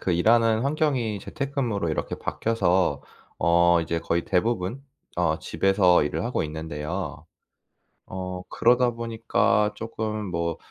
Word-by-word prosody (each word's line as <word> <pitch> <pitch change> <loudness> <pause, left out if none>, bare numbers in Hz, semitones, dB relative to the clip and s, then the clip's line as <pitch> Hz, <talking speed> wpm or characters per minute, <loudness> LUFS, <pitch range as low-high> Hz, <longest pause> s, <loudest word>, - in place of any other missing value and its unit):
그 90 - 0
일 90 +6 +2
하는 115 -1 +4
환경이 135 -7 0
재택근무로 135 - -2
이렇게 80 - -2
바뀌어서 95 -9 0 0.4
어 85 +1 +4
이제 85 0 -2
거의 85 +1 -1
대부분 100 +4 0 0.4
어 85 -3 +1
집에서 95 -4 +3
일을 75 - -2
하고 - - -1
있는데요. 80 +1 -5 0.8
어 90 0 -5
그러다 125 +1 +3
보니까 110 -2 +1
조금 110 -1 -4
뭐 85 -1 -2
95 Hz, 275 characters per minute, -25 LUFS, 85-115 Hz, 0.8 s, 하는